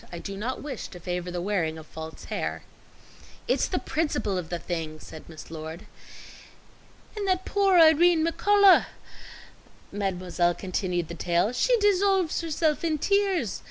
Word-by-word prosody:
"I 175 - -6
do 195 +3 -6
not 235 +8 -4
wish 290 -2 -5
to 180 - -11
favor 180 +1 -4
the 175 0 -4
wearing 175 -6 -1
of 160 - -10
false 160 0 -9
hair." - - -4 0.8
"It's - - +1
the - - -2
principle 255 -11 -1
of 175 -3 -4
the 175 - -2
thing," 160 -2 -5
said 155 +1 -12
Miss 160 -1 -11
Lord. 160 +2 -7 1.3
"And 410 -2 -3
that 370 0 0
poor 395 -2 +3
Irene 325 0 +6
McCullough," 400 +3 +5 1.0
Mademoiselle 180 -3 -1
continued 180 -3 -2
the 170 - -7
tale, 175 +4 0
"she 485 - +2
dissolves 390 -5 +2
herself 315 -1 0
in 320 -2 0
tears. 385 - 0
205 Hz, 150 wpm, -26 LUFS, -, 1.3 s, Irene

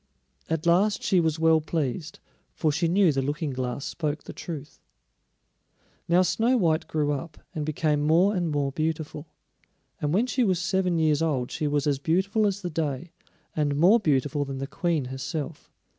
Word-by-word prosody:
At 160 0 -1
last 190 +5 +3
she 185 - +3
was 160 -2 +1
well 160 0 +4
pleased, 155 +1 -3 0.4
for 155 - +1
she 165 +4 0
knew 180 0 +4
the 135 -1 0
Looking 145 +2 -2
glass 130 +1 -3
spoke 150 -2 -3
the - - -9
truth. 150 -4 -8 1.3
Now 175 +2 +5
Snow 225 +8 +2
white 165 -6 +1
grew 150 -2 0
up, 150 +3 -5 0.2
and 155 -4 -3
became 150 -1 +1
more 170 +7 +3
and 175 -3 0
more 145 -2 0
beautiful; 155 0 -3 0.7
and 150 - 0
when 205 +8 +3
she 255 0 0
was 190 -5 +2
seven 180 -1 0
years 155 -2 +2
old 135 -6 0
she 155 -2 -2
was 145 0 0
as 145 -2 +1
beautiful 190 +8 +1
as 200 0 -3
the 175 - -3
day, 155 0 -3 0.4
and 145 -2 +1
more 185 +10 +5
beautiful 145 - +1
than 135 -1 -5
the 135 - -3
Queen 165 -1 -1
herself. 145 +4 -5
160 Hz, 175 wpm, -26 LUFS, 145-175 Hz, 1.3 s, Now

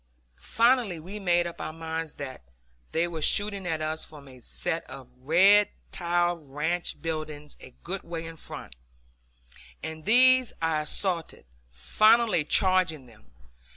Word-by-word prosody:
Finally 230 - +2
we 190 +6 -8
made 175 -3 +2
up 170 0 -7
our - - -4
minds 160 -1 -5
that 130 - -7 0.5
they 165 +2 +1
were 165 -2 -6
shooting 200 +2 +1
at 160 -2 -2
us 155 +1 -2
from 145 -2 -12
a 130 -1 -14
set 165 +6 -3
of 135 -2 -10
red 190 +9 +5 0.2
tiled 175 -3 -1
ranch 160 +5 -2
buildings 155 -2 -5
a 130 - -14
good 190 +2 -4
way 165 -1 -6
in 165 0 -8
front, 105 - -10 1.1
and 160 -1 -7
these 255 +3 +5
I 160 -1 0
assaulted, 170 +1 -2 0.2
finally 215 - +3
charging 180 -4 +2
them. 110 -3 -20
165 Hz, 140 wpm, -27 LUFS, 155-190 Hz, 1.1 s, red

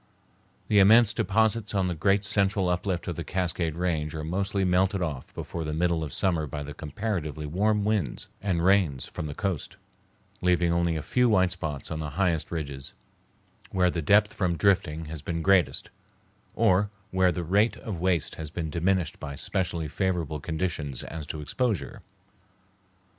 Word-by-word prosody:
The 105 - +4
immense 110 +3 +7
deposits 110 +1 +1
on 95 -2 +2
the 90 - -1
great 100 +5 +2
central 100 -2 +1
uplift 90 -1 -1
of 85 - -2
the 85 - -3
Cascade 85 -1 -1
Range 80 -3 -1
are 80 - -4
mostly 95 +4 0
melted 95 +2 +2
off 75 -6 -4
before 85 - -5
the 75 -1 -3
middle 85 -1 +1
of 75 - -5
summer 85 -5 +1
by 75 +1 -5
the 75 +1 -7
comparatively 80 -2 -4
warm 100 +6 +1
winds 105 - -1
and 90 -4 0
rains 90 -10 +3
from 75 - -6
the 75 - -6
coast, 95 -7 -3 0.6
leaving 90 -1 +3
only 85 -1 +1
a 80 - -3
few 125 -1 +2
white 95 -4 +3
spots 75 -6 -4
on 80 - -3
the 75 -1 -3
highest 90 -5 +1
ridges, 70 -5 -5 0.8
where 90 -1 +2
the 85 - -2
depth 105 +7 +4
from 90 -4 0
drifting 80 -5 +2
has 80 -1 -7
been 85 +1 -3
greatest, 95 -5 +2 0.6
or 95 +3 +3 0.2
where 95 -1 +3
the 90 - -3
rate 100 +7 +2
of 95 -7 -6
waste 90 -5 +1
has 80 - -5
been 80 -1 -4
diminished 90 +1 0
by 70 0 -6
specially 85 -1 -2
favorable 85 -3 -1
conditions 80 -4 -3
as 80 -2 -7
to 75 - -5
exposure. 110 - -2
90 Hz, 170 wpm, -27 LUFS, 80-95 Hz, 0.8 s, immense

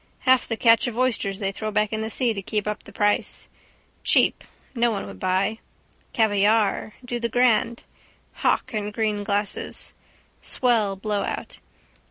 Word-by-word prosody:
Half 260 -2 +4
the 225 - -2
catch 230 +1 +4
of 235 -1 -5
oysters 225 -6 0
they 195 -1 -1
throw 215 +2 -4
back 210 0 0
in 220 - -1
the 220 - -3
sea 235 0 +1
to 200 - -5
keep 210 +1 -2
up 210 0 -3
the - - -14
price. 205 0 0 0.6
Cheap - - +4 0.3
no 240 -2 +2
one 210 -3 -3
would 95 -2 -10
buy. 190 - 0 0.5
Caviare. 215 0 +2
Do 240 -1 -3
the 235 0 -1
grand. 235 -1 +2 0.6
Hock 260 - +1
in 210 -1 -2
green 210 -1 -1
glasses. 205 0 -2 0.5
Swell 225 -6 +2
blowout. 205 +1 -3
215 Hz, 155 wpm, -24 LUFS, 205-230 Hz, 0.6 s, Half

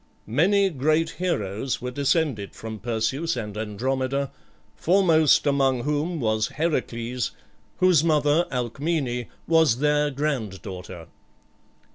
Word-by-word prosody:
Many 190 - +3
great 155 +3 +1
heroes 125 - -1
were 125 0 -4
descended 140 - 0
from 110 -1 -7
Perseus 125 +8 -1
and 105 -3 -5
Andromeda, 130 +6 -2 0.4
foremost 165 -5 +4
among 135 -3 +2
whom 150 +3 -1
was 110 -3 +1
Heracles, 125 -6 -2 0.4
whose 180 -5 +4
mother, 155 +1 +3
Alcmene, 125 0 -2 0.2
was 160 -7 +4
their 150 +1 +2
granddaughter. 105 - -4
135 Hz, 100 wpm, -24 LUFS, 115-155 Hz, 0.4 s, foremost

